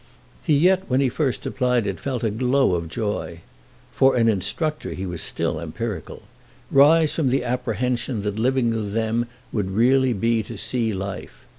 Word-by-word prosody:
He 150 - +2
yet 185 +5 +4
when 130 +1 +2
he 135 -2 +2
first 130 0 -2
applied 125 -4 +1
it 100 -2 -3
felt 130 -4 -3
a 110 - +1
glow 125 0 +2
of 85 -2 -2
joy—for 85 - -2
an 115 -2 +3
instructor 155 - -1
he 95 - -5
was 90 -3 -4
still - - -2
empirical—rise 120 - 0
from 150 -6 +1
the 130 0 +1
apprehension 125 -2 -2
that 105 +1 -3
living 125 0 +2
with 105 -3 -3
them 115 +1 0 0.2
would 100 -4 -1
really 125 +5 +3
be 115 +2 +1
to 110 +1 -8
see 115 +2 -1
life. 100 -1 -6
115 Hz, 160 wpm, -23 LUFS, 105-130 Hz, 0.2 s, yet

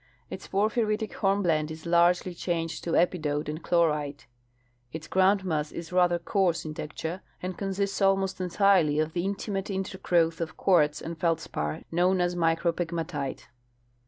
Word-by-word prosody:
Its - - -7
por 200 +2 +2
phyritic 220 -1 -1
hornblende 175 -6 +1
is 160 +1 -9
largely 175 +1 +3
changed 165 -2 -3
to 170 - -2
epidote 155 -4 +1
and 155 +2 -4
chlorite. 150 -4 0 0.7
Its 160 +1 -7
groundmass 185 -5 +2
is 170 0 -7
rather 180 -1 +4
coarse 175 -1 0
in 155 - -5
texture, 160 +4 -5 0.2
and 185 0 -4
consists 195 +1 -2
almost 195 -1 +2
entirely 180 -4 +3
of 155 +1 0
the 175 - -1
intimate 195 0 -3
intergrowth 180 -4 0
of 165 - -4
quartz 150 -6 +3
and 165 0 -6
feldspar 155 - -2
known 180 +2 +2
as 175 0 +1
micropegmatite. 165 -3 -1
175 Hz, 140 wpm, -27 LUFS, 160-190 Hz, 0.7 s, rather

